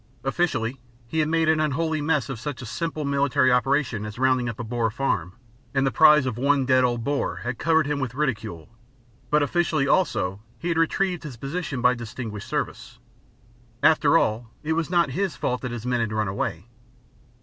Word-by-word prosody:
Officially, 135 Hz, -4 st, -1 dB, 0.3 s
he 160 Hz, +7 st, -2 dB
had 155 Hz, -, +2 dB
made 165 Hz, 0 st, +2 dB
an 160 Hz, 0 st, +3 dB
unholy 155 Hz, +1 st, 0 dB
mess 150 Hz, -3 st, +1 dB
of 135 Hz, -5 st, -5 dB
such 135 Hz, -2 st, -5 dB
a -, -, -6 dB
simple 155 Hz, +4 st, -3 dB
military 140 Hz, -1 st, +2 dB
operation 125 Hz, -3 st, +1 dB
as 105 Hz, 0 st, -7 dB
rounding 130 Hz, -1 st, +2 dB
up 115 Hz, -, -7 dB
a -, -, -3 dB
Boer 115 Hz, 0 st, -1 dB
farm, 105 Hz, -7 st, -1 dB, 0.4 s
and 135 Hz, 0 st, +3 dB
the 135 Hz, -, +1 dB
prize 150 Hz, -3 st, +6 dB
of 120 Hz, -3 st, -3 dB
one 140 Hz, 0 st, +2 dB
dead 130 Hz, 0 st, +4 dB
old 120 Hz, -2 st, 0 dB
Boer 140 Hz, +3 st, -2 dB
had 120 Hz, 0 st, -4 dB
covered 160 Hz, -2 st, +3 dB
him 145 Hz, 0 st, -1 dB
with 130 Hz, -3 st, -3 dB
ridicule; 115 Hz, -, -2 dB, 0.6 s
but 150 Hz, 0 st, +3 dB
officially, 155 Hz, -2 st, +1 dB
also, 95 Hz, -, +1 dB, 0.2 s
he 175 Hz, -, -4 dB
had 165 Hz, -, 0 dB
retrieved 180 Hz, +2 st, +1 dB
his 140 Hz, -7 st, -8 dB
position 140 Hz, -1 st, -4 dB
by 125 Hz, -, +5 dB
distinguished 115 Hz, -3 st, -6 dB
service. -, -, -4 dB, 0.9 s
After 155 Hz, 0 st, +5 dB
all, 115 Hz, -4 st, 0 dB
it 160 Hz, +1 st, 0 dB
was 165 Hz, 0 st, -1 dB
not 175 Hz, -1 st, +2 dB
his 190 Hz, -4 st, -1 dB
fault 125 Hz, -, -2 dB
that 125 Hz, -, -3 dB
his 120 Hz, -1 st, -6 dB
men 125 Hz, -1 st, 0 dB
had 115 Hz, -2 st, -1 dB
run 110 Hz, -1 st, 0 dB
away. 95 Hz, -2 st, -3 dB
135 Hz, 195 wpm, -24 LUFS, 120-155 Hz, 0.9 s, prize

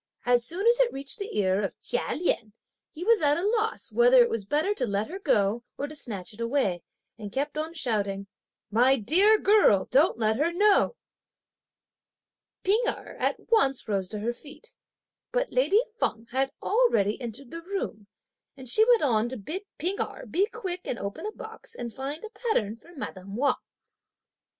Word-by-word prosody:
As 245 Hz, -1 st, +3 dB
soon 370 Hz, +5 st, -2 dB
as 475 Hz, +1 st, +5 dB
it -, -, +3 dB
reached 275 Hz, +8 st, -5 dB
the 400 Hz, -, -5 dB
ear 190 Hz, -1 st, +2 dB
of 195 Hz, -, -4 dB
Chia 485 Hz, -, -2 dB
Lien, 230 Hz, -10 st, -1 dB, 0.4 s
he 335 Hz, -, -8 dB
was 455 Hz, 0 st, +4 dB
at 290 Hz, -1 st, +4 dB
a 350 Hz, -, -1 dB
loss 440 Hz, +1 st, 0 dB
whether -, -, +6 dB
it 475 Hz, -, -2 dB
was 210 Hz, -4 st, -2 dB
better 305 Hz, -, +1 dB
to 255 Hz, -11 st, -1 dB
let 200 Hz, +1 st, -1 dB
her 380 Hz, -, -6 dB
go 225 Hz, -, +1 dB
or 285 Hz, -, -2 dB
to 305 Hz, -, -9 dB
snatch 215 Hz, -9 st, -3 dB
it 220 Hz, -, -10 dB
away, 230 Hz, -8 st, 0 dB, 0.4 s
and 205 Hz, -2 st, -7 dB
kept 285 Hz, +5 st, -2 dB
on 315 Hz, +2 st, -4 dB
shouting, 200 Hz, -8 st, -1 dB, 0.5 s
"My 250 Hz, +5 st, +5 dB
dear 375 Hz, -, +5 dB
girl! 405 Hz, -, +4 dB
don't 285 Hz, +4 st, +4 dB
let 220 Hz, -1 st, +1 dB
her 315 Hz, +5 st, +1 dB
know." 410 Hz, +5 st, +3 dB, 1.7 s
P'ing 410 Hz, +5 st, +3 dB
Erh -, -, -3 dB
at -, -, -2 dB
once 275 Hz, -, +3 dB
rose 195 Hz, -3 st, -1 dB
to 215 Hz, -, -5 dB
her 235 Hz, +3 st, -1 dB
feet; 295 Hz, -, -11 dB, 0.6 s
but -, -, -1 dB
lady 480 Hz, -3 st, +3 dB, 0.2 s
Feng 225 Hz, -, 0 dB
had 270 Hz, +2 st, +1 dB
already 330 Hz, -, +2 dB
entered 240 Hz, +2 st, -7 dB
the 335 Hz, -, -6 dB
room; 335 Hz, -, -5 dB, 0.5 s
and 260 Hz, -1 st, -9 dB
she 435 Hz, -, +6 dB
went 475 Hz, -7 st, +5 dB
on 235 Hz, -4 st, +2 dB
to 260 Hz, -, -6 dB
bid 325 Hz, -, -6 dB
P'ing 370 Hz, +5 st, -2 dB
Erh -, -, -3 dB
be 390 Hz, +4 st, +1 dB
quick 360 Hz, -3 st, -6 dB
and 240 Hz, -, -2 dB
open 200 Hz, -, -5 dB
a -, -, -4 dB
box 440 Hz, +1 st, -7 dB
and 235 Hz, -2 st, -6 dB
find 280 Hz, +6 st, -5 dB
a 440 Hz, -, -8 dB
pattern 230 Hz, -, -1 dB
for 325 Hz, +9 st, -18 dB
madame 195 Hz, -7 st, -7 dB
Wang. 280 Hz, +5 st, +2 dB
280 Hz, 185 wpm, -27 LUFS, -, 1.7 s, whether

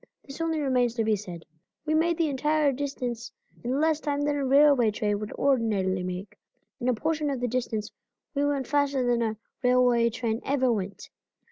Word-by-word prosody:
This 275 Hz, +3 st, -8 dB
only 325 Hz, -1 st, 0 dB
remains 250 Hz, -4 st, +1 dB
to 230 Hz, -, +1 dB
be 215 Hz, -1 st, +2 dB
said: 180 Hz, -5 st, -8 dB, 0.4 s
We 310 Hz, -, 0 dB
made 330 Hz, +1 st, +2 dB
the 330 Hz, -, +2 dB
entire 295 Hz, +1 st, +1 dB
distance 250 Hz, -3 st, -4 dB, 0.3 s
in 255 Hz, +3 st, -1 dB
less 315 Hz, 0 st, +2 dB
time 290 Hz, -2 st, -2 dB
than 290 Hz, 0 st, +1 dB
a 285 Hz, -, -1 dB
railway 275 Hz, -3 st, +5 dB
train 210 Hz, -1 st, -1 dB
would 210 Hz, 0 st, -6 dB
ordinarily 215 Hz, -9 st, +1 dB
make, 180 Hz, +2 st, -6 dB, 0.4 s
and 245 Hz, -, 0 dB
a -, -, +3 dB
portion 305 Hz, +4 st, -1 dB
of 270 Hz, -3 st, -2 dB
the 245 Hz, -, -1 dB
distance 225 Hz, -3 st, -2 dB, 0.4 s
we 285 Hz, -1 st, 0 dB
went 285 Hz, -2 st, 0 dB
faster 280 Hz, -2 st, +1 dB
than 240 Hz, -1 st, +2 dB
a 220 Hz, -1 st, -1 dB, 0.2 s
railway 250 Hz, -2 st, +4 dB
train 230 Hz, 0 st, -2 dB
ever 260 Hz, -2 st, +1 dB
went. 200 Hz, -2 st, -5 dB
250 Hz, 190 wpm, -27 LUFS, 225-285 Hz, 0.4 s, railway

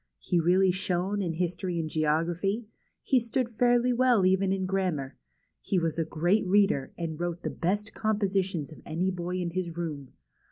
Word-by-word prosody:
He 175 Hz, -, 0 dB
really 180 Hz, +3 st, +4 dB
shone 185 Hz, +2 st, -1 dB
in 170 Hz, -4 st, -1 dB
history 175 Hz, +1 st, -2 dB
and 160 Hz, -, -2 dB
geography; 165 Hz, +8 st, 0 dB, 0.4 s
he 265 Hz, -, +3 dB
stood 235 Hz, +1 st, -1 dB
fairly 245 Hz, +2 st, +3 dB
well 240 Hz, -5 st, +4 dB
even 190 Hz, +1 st, +3 dB
in 190 Hz, -1 st, 0 dB
grammar; 180 Hz, -8 st, -1 dB, 0.4 s
he 195 Hz, -, -1 dB
was 165 Hz, -2 st, 0 dB
a -, -, +2 dB
great 175 Hz, +7 st, +1 dB
reader, 195 Hz, -8 st, +3 dB
and 165 Hz, -2 st, -4 dB
wrote 175 Hz, 0 st, -3 dB
the -, -, -2 dB
best 205 Hz, +5 st, -2 dB
compositions 195 Hz, -7 st, -1 dB
of 155 Hz, -, -12 dB
any 180 Hz, +4 st, -1 dB
boy 180 Hz, 0 st, -4 dB
in 180 Hz, -2 st, -2 dB
his 170 Hz, -2 st, -3 dB
room. 150 Hz, -6 st, -5 dB
180 Hz, 170 wpm, -28 LUFS, 165-200 Hz, 0.4 s, really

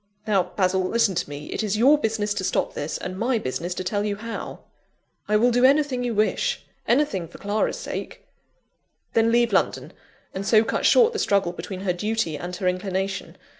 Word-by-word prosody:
Now, 205 Hz, -3 st, +3 dB
Basil, 190 Hz, -1 st, +2 dB
listen 210 Hz, +1 st, +2 dB
to 170 Hz, -, -2 dB
me: 145 Hz, +1 st, -7 dB
it -, -, -2 dB
is 210 Hz, -1 st, -1 dB
your 265 Hz, +7 st, +6 dB
business 220 Hz, -6 st, -1 dB
to 205 Hz, -, -3 dB
stop -, -, 0 dB
this, 145 Hz, +2 st, -3 dB
and 185 Hz, +1 st, -6 dB
my 240 Hz, +1 st, +1 dB
business 175 Hz, +1 st, -3 dB
to -, -, -3 dB
tell 205 Hz, +3 st, -1 dB
you 205 Hz, -1 st, -1 dB
how." 225 Hz, +2 st, -7 dB, 0.7 s
"I 210 Hz, -, +3 dB
will 245 Hz, +3 st, +3 dB
do 245 Hz, +1 st, +2 dB
anything 275 Hz, -2 st, +3 dB
you 240 Hz, -2 st, -2 dB
wish 350 Hz, -, 0 dB, 0.2 s
anything 235 Hz, -, +1 dB
for 170 Hz, -, -13 dB
Clara's 205 Hz, +2 st, -1 dB
sake!" -, -, -6 dB, 0.9 s
"Then 225 Hz, 0 st, +3 dB
leave 235 Hz, -2 st, +3 dB
London; 190 Hz, -, 0 dB, 0.4 s
and 190 Hz, -, -4 dB
so 215 Hz, +2 st, +4 dB
cut 225 Hz, -, 0 dB
short 470 Hz, -1 st, +5 dB
the 435 Hz, -, -2 dB
struggle 195 Hz, -3 st, +2 dB
between 185 Hz, +1 st, -7 dB
her 190 Hz, -2 st, 0 dB
duty 210 Hz, -3 st, -1 dB
and 175 Hz, +4 st, -5 dB
her 185 Hz, 0 st, -2 dB
inclination. 190 Hz, +1 st, -2 dB
205 Hz, 195 wpm, -24 LUFS, 185-230 Hz, 0.9 s, your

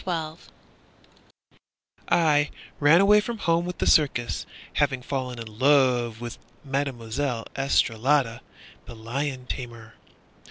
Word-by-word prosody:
Sam -, -, -24 dB, 0.3 s
Hookey -, -, -20 dB, 1.6 s
I 150 Hz, -3 st, +3 dB, 0.3 s
ran 150 Hz, +5 st, +6 dB
away 210 Hz, +1 st, +6 dB
from 235 Hz, +2 st, -5 dB
home 170 Hz, -4 st, +1 dB
with 180 Hz, 0 st, -5 dB
the -, -, -1 dB
circus, 130 Hz, -6 st, +2 dB, 0.3 s
Having 135 Hz, -3 st, 0 dB
fallen 130 Hz, -2 st, -4 dB
in 115 Hz, -, -6 dB
love 120 Hz, -1 st, +2 dB
with 120 Hz, -1 st, -7 dB, 0.2 s
Mademoiselle 135 Hz, -3 st, -2 dB
Estralada, 135 Hz, -2 st, +1 dB, 0.4 s
The 120 Hz, -, -10 dB
lion 130 Hz, +4 st, -4 dB
tamer. 115 Hz, -3 st, -7 dB
135 Hz, 115 wpm, -25 LUFS, 120-145 Hz, 1.6 s, ran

